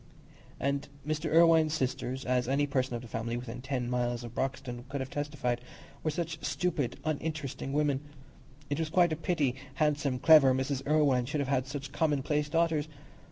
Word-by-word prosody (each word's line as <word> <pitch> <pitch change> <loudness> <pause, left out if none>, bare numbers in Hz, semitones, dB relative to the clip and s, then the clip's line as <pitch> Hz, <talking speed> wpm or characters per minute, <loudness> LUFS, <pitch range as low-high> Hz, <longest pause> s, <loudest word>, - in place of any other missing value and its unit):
And 140 +1 -1 0.2
Mr. 155 +1 -2
Irwine's 160 -1 +5
sisters, 130 -1 -2
as 125 -1 +1
any 140 +2 +2
person 130 -3 -1
of 120 +1 -6
family 115 +1 -3
within 120 0 -6
ten 130 -2 -2
miles 120 -1 -1
of 120 -1 -8
Broxton 130 -1 -3
could 140 0 -3
have 130 0 -5
testified, 145 -5 -2 0.4
were 155 - 0
such 165 0 -3
stupid, 165 -8 -1
uninteresting 155 -3 -3
women! 145 -1 +1 0.7
It 145 - -2
was 160 -1 -1
quite 175 0 +4
a - - 0
pity 155 -5 0 0.2
handsome, 150 -3 +1
clever 140 -2 +7
Mrs. 130 0 -1
Irwine 140 -5 +3
should 150 - -2
have 135 - -2
had 130 -2 +1
such 140 0 -5
commonplace 150 -1 0
daughters. 165 -2 +1
140 Hz, 165 wpm, -30 LUFS, 130-155 Hz, 0.7 s, clever